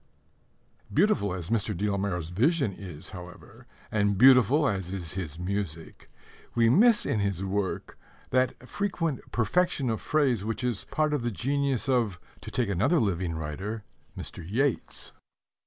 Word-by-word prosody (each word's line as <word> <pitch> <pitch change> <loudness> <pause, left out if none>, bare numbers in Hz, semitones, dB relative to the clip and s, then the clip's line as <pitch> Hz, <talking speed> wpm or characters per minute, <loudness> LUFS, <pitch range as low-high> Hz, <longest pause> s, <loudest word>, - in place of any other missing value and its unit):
Beautiful 180 - +2
as 90 +1 -6
Mr. 105 -3 0
de 105 +4 0
la 100 - 0
Mare's 90 -5 -2
vision 130 - +2
is, 90 -6 -9
however, 90 -1 -11 0.2
and 100 -2 +2
beautiful 130 +4 +6
as 95 -5 -2
is 90 -4 -5
his 80 -5 -5
music, 90 -3 -5 0.5
we 115 -1 +4
miss 225 - +5
in 110 - 0
his 100 -2 -1
work 100 0 -3 0.3
that 130 0 0
frequent 165 -7 -1
perfection 135 +1 +1
of 110 - -3
phrase 135 -9 +1
which 115 +3 -3
is 120 -5 -1
part 155 -1 0
of 145 - 0
the 120 - -1
genius 135 +3 -1
of 115 -8 +1 0.2
(to - - -8
take 120 -3 0
another 100 - +2
living 90 -6 0
writer) 95 +8 -4 0.3
Mr. - - -7
Yeats. 120 - -1
105 Hz, 150 wpm, -28 LUFS, 95-135 Hz, 0.5 s, beautiful